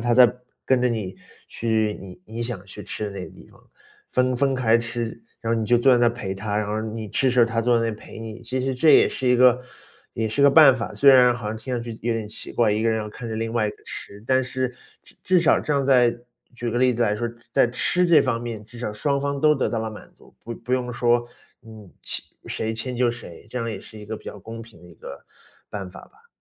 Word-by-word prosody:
他 120 +1 +1
再 125 -1 +7 0.3
跟 130 -2 +2
着 125 - +3
你 105 -6 -3 0.3
去 110 -2 -1
你 90 -2 -11
你 115 +2 -6
想 115 -6 -5
去 - - -10
吃 - - -6
的 - - -5
那 95 -2 -6
个 - - -11
地 - - -16
方， - - -21 0.5
分 125 0 +2
分 135 0 +1
开 115 -2 +3
吃， 115 -1 -4 0.2
然 115 0 -1
后 115 - +1
你 110 - -2
就 120 - +4
坐 130 +3 +4
在 120 - +5
那 120 - +4
儿 - - +6
陪 105 -5 -4
他， 105 +2 -3
然 105 - 0
后 110 +1 -1
你 110 -1 -5
吃 135 - 0
的 125 - +3
时 125 - +4
候 - - +7
他 115 0 -1
坐 120 +1 +3
在 115 - +1
那 115 - 0
里 105 - -7
陪 110 - -11
你。 110 0 -8
其 125 +2 -3
实 135 +1 -1
这 150 +5 +4
也 - - +6
是 130 -2 -2
一 125 - +5
个 125 0 +5 0.5
也 110 -1 -2
是 125 +6 -2
个 140 - +8
办 140 -3 +7
法， 115 - -5
虽 140 -1 +6
然 125 -2 +6
好 105 -3 -5
像 110 - -4
听 125 +3 -5
上 120 - -2
去 115 -1 -7
有 120 0 0
点 110 -2 -4
奇 - - -7
怪， 115 -3 +2
一 110 +2 0
个 - - +3
人 110 0 +1
要 105 - -5
看 115 +2 -8
着 110 - -4
另 115 +1 -3
外 110 -3 +1
一 - - -2
个 - - -22
吃， 100 +1 -9
但 130 +1 +2
是 130 0 -2 0.3
至 - - -20
至 185 -2 +4
少 165 - +4
这 150 - -2
样 140 -1 +1
在 125 -3 +4 0.4
举 120 0 -3
个 120 - -1
例 125 -1 +3
子 120 - 0
来 105 -2 +1
说， 120 +1 -2 0.2
在 - - +4
吃 175 +8 +1
这 170 -2 +6
方 120 -3 -1
面， 115 -3 -6
至 120 +2 -13
少 105 -3 -3
双 140 +6 -1
方 140 0 -2
都 150 0 +5
得 - - 0
到 115 - -2
了 110 0 -3
满 105 - -11
足， - - -21
不 115 - -5
不 120 +3 -6
用 125 -1 0
说， 120 0 +2 0.4
嗯， 110 -4 -12
谁 - - -4 0.2
谁 110 0 -3
迁 125 +3 -4
就 120 -1 +2
谁， 115 -8 -11
这 125 - -3
样 115 -1 -2
也 105 -4 -5
是 110 - -13
一 105 - -10
个 110 0 -4
比 - - -16
较 105 - -8
公 115 +3 -9
平 110 -7 -16
的 90 - -15
一 85 - -15
个 - - -11 0.4
办 95 -3 -6
法 - - -12
吧。 450 +3 -21
115 Hz, 300 characters per minute, -23 LUFS, 110-125 Hz, 0.5 s, 个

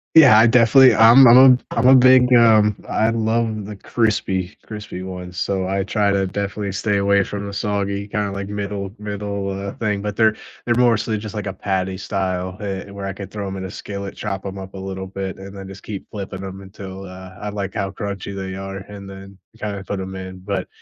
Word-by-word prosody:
Yeah. 130 -9 +9
I 115 - +7
definitely 125 +3 +6
I'm 120 +4 +8
I'm 120 - +8 0.2
a 125 - -7
I'm 125 - +3
a 130 - +8
big, 130 0 +6
um, 110 -3 +5
I 110 +1 +1
love 110 -2 -1
the 105 -1 -7
crispy 100 -4 -1
crispy 105 -4 -7
ones. 90 -1 -7
So, 95 -2 -1
I 95 0 -1
try 105 0 +1
to 100 -1 +1
definitely 100 +1 -3
stay 100 +1 0
away 100 0 +3
from 100 0 -5
the 100 - -6
soggy 100 0 -2
kinda 105 -1 -2
like 100 0 -5
middle 100 -1 -4
middle, 100 -1 -4
uh, 100 +1 -4
thing, 105 -3 -2
but 105 -1 -4
they're 110 -1 +4 0.3
they're 120 - +1
mostly 115 -3 +2
just 105 0 -7
like 105 -1 -4
a 95 - -2
patty 95 -1 -2
style 95 -1 -3
heh 100 -1 -5
where 100 0 -6
I 95 - -3
could 100 +1 -9
throw 105 -1 -5
them 95 0 -5
in 95 - -5
a - - -8
skillet, 100 +1 -7
chop 100 -2 -4
'em 95 0 -6
up 95 0 -9
a - - -7
little 95 0 -5
bit, 95 0 -5
and 95 +1 -10
then 95 -1 -8
just 95 0 -11
keep 100 -3 -7
flipping 100 -2 -6
them 95 0 -7
until, 95 0 -9
uh, 95 0 -11
I 105 - -4
like 100 -2 -5
how 100 -3 -2
crunchy 100 -1 -5
they 95 -1 -5
are 95 0 -6
and 100 0 -10
then 95 0 -11 0.2
kinda 100 -2 -4
put 100 - -3
them 95 0 -6
in. 95 0 -8
But, 95 -1 -3
100 Hz, 220 wpm, -20 LUFS, 95-105 Hz, 0.3 s, Yeah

